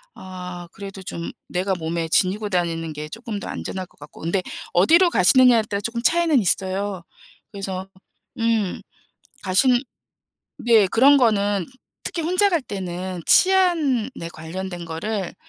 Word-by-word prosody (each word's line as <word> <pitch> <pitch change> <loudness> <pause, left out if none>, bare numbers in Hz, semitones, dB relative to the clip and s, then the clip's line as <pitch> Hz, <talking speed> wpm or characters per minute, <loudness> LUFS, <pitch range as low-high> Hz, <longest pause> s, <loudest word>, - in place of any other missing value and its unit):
아 180 -1 -8
그래도 195 -1 -9
좀 170 -2 -6 0.2
내가 190 +2 -1
몸에 165 -1 -3
지니고 205 +4 +1
다니는 165 -3 -2
게 150 +1 -7
쪼끔 225 +1 -6
더 - - -7
안전할 185 -1 -5
것 - - -29
같고. 145 - -13
그런데 170 +4 -1 0.3
어디로 335 - +5
가시느냐에 245 - +5
따라 205 -1 -4
쪼끔 235 +2 -3
차이는 330 -2 +3
있어요. 190 -1 0 0.5
그래서 195 -1 -5 0.5
음. 225 -4 0 0.6
가시는 240 +7 +4 0.8
네 225 -4 +4
그런 270 +9 +5
거는 205 -5 +1 0.4
특히 335 - -3
혼자 365 +5 +2
갈 340 -7 0
때는 185 -3 -5
치안에 335 - +4 0.2
관련된 175 +2 -7
거를 190 +4 -4
195 Hz, 285 characters per minute, -22 LUFS, 180-235 Hz, 0.8 s, 어디로